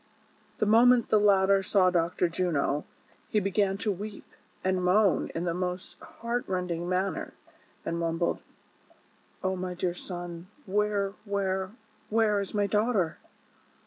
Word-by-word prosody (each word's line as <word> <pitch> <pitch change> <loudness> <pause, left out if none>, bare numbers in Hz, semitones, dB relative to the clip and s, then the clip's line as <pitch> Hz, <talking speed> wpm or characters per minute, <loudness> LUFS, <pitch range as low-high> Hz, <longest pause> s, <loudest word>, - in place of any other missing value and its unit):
The 215 - +1
moment 235 +3 +5
the 215 - +5
latter 195 -1 +4
saw 190 -1 +3
Dr. 175 0 +1
Juno, 165 -4 0 0.4
he 215 - +2
began 195 0 +1
to 210 +1 -1
weep 205 +2 -6 0.4
and 185 -1 +1
moan 190 +1 +3
in 165 - -1
the 170 -1 0
most 180 +1 -4
heart 235 +1 -4
rending 180 -2 -2
manner, 185 +2 -1 0.5
and 170 - -2
mum 165 -1 -1
bled: 170 - 0 0.6
" - - -34
O 190 0 0
my 180 -1 -4
dear 180 0 -1
son! 175 -1 -7 0.2
where 200 0 0
— - - -33
where 190 -1 0 0.2
— - - -35
where 215 -2 +3
is 200 +1 -4
my 205 -1 +2
daugh 215 +5 +1
ter?" 175 -7 0
190 Hz, 155 wpm, -28 LUFS, 180-210 Hz, 0.6 s, moment